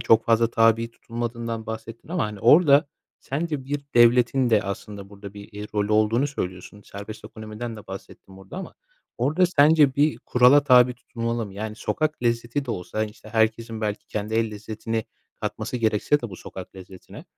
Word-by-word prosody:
çok 115 0 +4
fazla 115 0 +3
tabi 115 0 +3
tutulmadığından 115 -1 -5
bahsettin 110 +2 -8
ama, 175 0 0
hani, 105 -1 -6
orada 145 - +6 0.3
sence 150 -1 -3
bir 145 +2 -3
devletin 120 +2 +4
de, 110 -2 +4
aslında, 100 0 -6
burada 100 0 -11
bir, 100 0 -11
eee, 105 +1 -6
rolü 105 0 0
olduğunu 110 +5 +3
söylüyorsun? 95 -6 -6
Serbest 100 +3 -9
ekonomiden 110 +2 -7
de 105 - -12
bahsettin 95 0 -11
burada 95 - -11
ama 190 - -7 0.4
orada 155 +9 +3
sence 150 -4 +5
bir 150 +2 +2
kurala 125 +4 +5
tabi 125 -2 +6
tutulmalı 115 -1 -4
mı? 95 - -12
Yani, 110 +1 -5
sokak 155 +2 -2
lezzeti 120 +3 0
de 125 - -5
olsa, 90 0 -5
hani, 110 -1 0
işte, 105 - -16
herkesin 110 0 0
belki 105 -2 -3
kendi 105 +1 -4
el 115 -1 +1
lezzetini 110 +1 -4 0.4
katması - - -3
gerekse 115 +5 +1
de 120 - -6
bu 95 - -8
sokak 95 0 -10
lezzetine, 95 0 -12
115 Hz, 175 wpm, -24 LUFS, 105-125 Hz, 0.4 s, orada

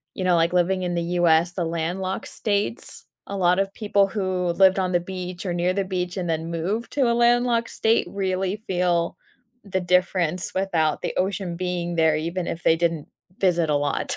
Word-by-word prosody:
you 185 - -3
know, 180 -1 +3
like, 170 +1 +2
living 185 +1 +2
in 175 -1 -2
the 170 - -1 0.2
US, 170 0 +4
the 175 -2 -2
landlocked 175 +3 -3
states, 205 +2 0 0.2
a 200 - -4
lot 180 0 +3
of 195 0 0
people 205 -2 +2
who 185 -4 -1
lived 190 +1 +5
on 185 -1 0
the 175 - +3
beach 180 +1 -6
or 175 - -1
near 175 +1 0
the 200 0 0
beach 180 -1 -3
and 180 -2 -2
then 160 +1 -2
moved 190 +8 -3
to 260 -5 +2
a - - +2
landlocked 240 0 +2
state 225 +1 +1
really 190 0 -1
feel 175 -2 0 0.5
the 190 -2 -2
difference 180 -1 +1
without 170 -5 0
the - - -3
ocean 185 -2 -1
being 175 -1 -3
there, 160 -1 +3
even 170 +3 -3
if 170 - -5
they 165 - +4
didn't 165 -3 -1 0.3
visit 175 -4 +2
a 150 - +2
lot. 145 -1 0
180 Hz, 195 wpm, -23 LUFS, 170-195 Hz, 0.5 s, lived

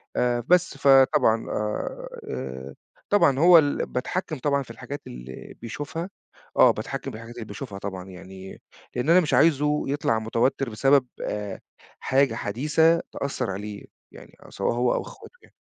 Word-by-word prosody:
آآ، 120 -1 +1
بس، 180 -5 +3
فطبعًا 135 -5 +4
آآ، 105 0 -3 0.2
آآ، 65 +1 -6 0.3
طبعًا 140 -10 +4
هو 175 +1 +8
ال 145 -3 +2
باتحكم 155 +5 -3
طبعًا 140 0 0
في 115 - -12
الحاجات 140 +5 -7
اللي 60 +1 -10
بيشوفها. 145 - -5 0.5
آه، - - +7
باتحكم - - -5
بالحاجات 115 +2 -10
اللي 115 -2 -7
بيشوفها 105 -1 -8
طبعًا 95 -2 -6
يعني 95 +1 -11 0.3
لأن 125 +5 -1
أنا 175 +2 +7
مش 155 -6 -1
عايزه 150 +1 +3
يطلع 135 -5 0
متوتر 115 +4 0
بسبب 135 +4 +3
آآ، 105 -2 -4 0.4
حاجة 135 +1 +2
حديثة 155 +9 +2
تأثر 135 -5 -3
عليه، 100 +1 -7 0.3
يعني - - -14
آآ، - - -13
سواء - - -1
هو 120 +1 +1
أو - - -1
أخواته - - -12
يعني. - - -22
125 Hz, 155 wpm, -25 LUFS, 105-145 Hz, 0.5 s, هو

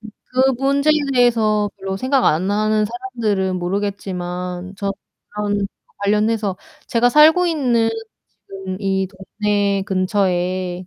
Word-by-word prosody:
그 255 +4 -1
문제에 280 +3 +3 0.2
대해서 215 -4 +3
별로 190 0 -4
생각 260 +4 +1
안하는 210 +6 +2
사람들은 220 -6 -2
모르겠지만 180 -1 -4
저런 205 +1 -4 0.3
관련해서 210 -1 +1 0.3
제가 240 +1 +3
살고 315 +5 +6
있는 245 -8 +1 0.6
지금 190 -1 -6
이 190 -1 0
동네 200 0 -1
근처에 185 -2 -1
205 Hz, 240 characters per minute, -20 LUFS, 190-230 Hz, 0.6 s, 살고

